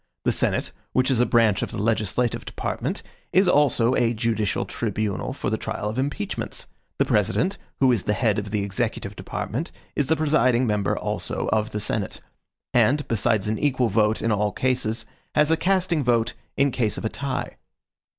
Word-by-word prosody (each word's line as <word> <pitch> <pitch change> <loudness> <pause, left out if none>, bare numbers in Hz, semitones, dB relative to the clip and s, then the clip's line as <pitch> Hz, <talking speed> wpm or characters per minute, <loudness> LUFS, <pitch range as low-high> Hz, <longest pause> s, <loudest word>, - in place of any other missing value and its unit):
The - - +4
Senate, - - 0 0.2
which 130 +1 +3
is 125 - +2
a 125 - +4
branch 115 -5 +3
of - - -2
the - - -6
legislative 110 +2 0
department, - - -3 0.3
is 190 +1 +4
also 130 -6 +4
a 120 -2 +2
judicial 110 -3 0
tribunal 105 -3 -2
for - - -3
the - - 0
trial 105 - -3
of 110 +4 -3
impeachments. 145 +10 -3 0.3
The - - +3
President, 190 - +1 0.2
who 130 -2 +5
is 115 -6 0
the 105 - +2
head 110 -5 +2
of 100 0 -5
the 105 -1 -1
executive 100 -1 -2
department, 145 - -4 0.2
is 145 - +1
the 160 - +3
presiding 135 -6 +3
member 105 -3 0
also - - -2
of 110 0 +1
the 105 - -3
Senate; 105 -1 -2 0.5
and, 145 +2 +3
besides 110 -2 +1
an 110 +1 -1
equal 130 -5 +2
vote 105 +1 +2
in 115 - +2
all 105 0 +1
cases, 115 -3 0 0.3
has 150 +1 +4
a - - +5
casting 180 -3 +1
vote 120 -2 +2 0.2
in 140 0 +3
case 115 -4 0
of - - -5
a - - +1
tie. 135 +1 -4
115 Hz, 180 wpm, -24 LUFS, 105-140 Hz, 0.5 s, who